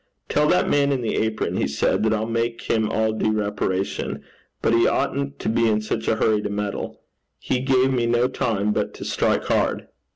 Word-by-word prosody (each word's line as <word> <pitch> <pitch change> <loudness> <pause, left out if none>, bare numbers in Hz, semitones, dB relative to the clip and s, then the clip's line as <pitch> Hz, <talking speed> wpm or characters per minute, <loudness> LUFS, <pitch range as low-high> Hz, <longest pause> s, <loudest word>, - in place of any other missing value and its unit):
'Tell 150 0 +2
that 180 - +3
man 140 -1 +2
in 130 -3 -1
the 115 - -1
apron,' 110 0 -1
he - - +1
said, 70 - 0
'that 110 0 +2
I'll 110 0 0
make 115 0 -2
him 110 -1 0
all 110 0 +1
due 110 0 0
reparation. 100 -2 -2 0.4
But 115 - +1
he 115 0 +4
oughtn't 140 0 -1
to - - -5
be 115 +1 +2
in 105 -1 +2
such 110 - -3
a - - +3
hurry 110 -1 +2
to 105 - -3
meddle. 105 -1 -4 0.4
He 125 - -1
gave 130 0 +2
me 120 -2 +1
no 120 +1 +3
time 105 -5 -1
but - - -2
to - - -8
strike - - +1
hard.' - - 0
110 Hz, 205 wpm, -23 LUFS, 105-125 Hz, 0.4 s, he